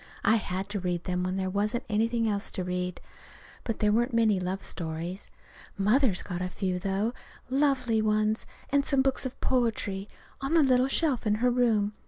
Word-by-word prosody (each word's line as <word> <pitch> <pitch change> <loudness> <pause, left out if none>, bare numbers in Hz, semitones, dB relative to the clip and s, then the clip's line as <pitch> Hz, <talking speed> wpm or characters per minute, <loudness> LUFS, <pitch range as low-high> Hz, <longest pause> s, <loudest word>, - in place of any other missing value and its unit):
I 220 +3 +5
had 190 -2 -3
to 205 -1 -2
read 175 -2 -2
them 180 -1 -1
when 185 +1 -1
there 190 -1 -1
wasn't 210 +4 0
anything 230 +2 +1
else 205 -1 0
to 185 - -2
read. 180 0 -3 0.6
But 225 - -2
there 210 -1 +2
weren't 240 +3 +1
many 220 -4 +3
love 185 +2 -3
stories. 170 +3 -4 0.5
Mother's 210 0 +2
got 180 -2 -4
a 180 - -2
few, 185 -1 -2
though 195 +5 -1 0.4
lovely 260 -5 +2
ones 215 0 +1 0.2
and 280 0 +3
some 275 -1 +2
books 265 0 0
of 255 - -11
poetry, 215 -6 0 0.3
on 275 +5 0
the 325 - +6
little 255 -1 +4
shelf 270 -4 +1
in 210 - +3
her 245 +3 +2
room. 225 -4 +2
215 Hz, 185 wpm, -28 LUFS, 190-245 Hz, 0.6 s, the